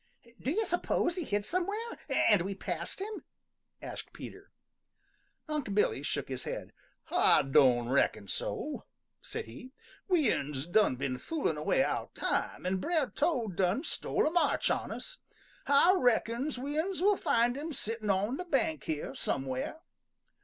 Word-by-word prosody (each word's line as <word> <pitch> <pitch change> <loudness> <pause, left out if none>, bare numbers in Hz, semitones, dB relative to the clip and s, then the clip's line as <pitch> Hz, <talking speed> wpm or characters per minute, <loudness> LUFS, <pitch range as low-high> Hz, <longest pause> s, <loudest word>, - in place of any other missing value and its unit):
"Do 255 - -1
you 435 +9 +1
suppose 350 -1 +1
he 360 - -2
hid 205 -6 -1
somewhere, 365 - 0 0.3
and 210 -5 +4
we 195 +3 -3
passed 175 - -4
him?" 415 +2 -5 0.6
asked - - -7
Peter. - - -10 1.0
Unc' 295 -10 -2
Billy 205 -9 +2
shook 145 -1 -2
his 130 -2 -4
head. - - -5 0.4
"Ah - - +5
don' 130 -3 +4
reckon 125 -5 +1
so," - - -3 0.4
said - - -5
he. 185 - -11 0.3
"We 330 - +4
uns 140 -1 -3
done 175 -4 +3
been 130 0 -3
foolin' 325 -2 -1
away - - +2
our - - -2
time, - - -1
an' 185 +1 +1
Brer 305 - 0
Toad 240 - 0
done 190 - +1
stole - - 0
a 305 - +2
march 345 0 +2
on - - -1
us. - - -6 0.5
Ah 285 +6 +6
reckons 245 - +1
we 285 +4 -2
uns 375 +3 -1
will 410 +1 +5
find 245 -8 +2
him 305 +4 -4
sittin' 225 -5 -3
on 200 +7 +1
the 360 - -5
bank 315 0 0
here 155 -2 -3
somewhere." 135 - -2
240 Hz, 155 wpm, -31 LUFS, -, 1.0 s, Ah